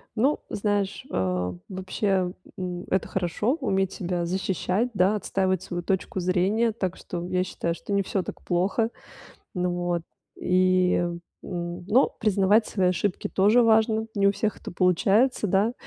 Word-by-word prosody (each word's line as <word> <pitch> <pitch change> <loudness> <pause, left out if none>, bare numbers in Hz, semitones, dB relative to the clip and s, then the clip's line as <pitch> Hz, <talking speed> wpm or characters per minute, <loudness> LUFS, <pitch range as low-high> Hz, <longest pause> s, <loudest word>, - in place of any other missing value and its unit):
Ну 270 +7 +2
знаешь, 205 -1 -1
э, 90 -1 -1 0.2
вообще, 190 -1 -1 0.3
м, 180 -1 -4
это 190 - 0
хорошо 190 - 0
уметь 195 -6 +1
себя 175 -1 -2
защищать, 190 +5 -1
да, 195 +2 +3
отстаивать 190 -3 0
свою 175 -2 -5
точку 190 +1 -1
зрения. 195 +6 +2
Так 190 -5 -3
что 175 -1 -5
я 180 0 +1
считаю, 170 -2 -3
что 200 - -6
не 200 - +3
всё 190 -1 -2
так - - -8
плохо. 190 +6 +1 0.7
М, 180 0 0
вот. 175 -1 -1 0.4
И, 185 0 +3 0.5
м, 175 -1 -5
ну 245 +7 +4
признавать 210 +1 +3
свои 185 -3 +1
ошибки 180 +2 -1
тоже 210 +5 +4
важно. 220 0 +3
Не 200 -1 +2
у 200 - +3
всех 215 +1 -2
это - - -7
получается, 200 +7 +2
да. 200 +5 +2
190 Hz, 150 wpm, -26 LUFS, 180-210 Hz, 0.7 s, ну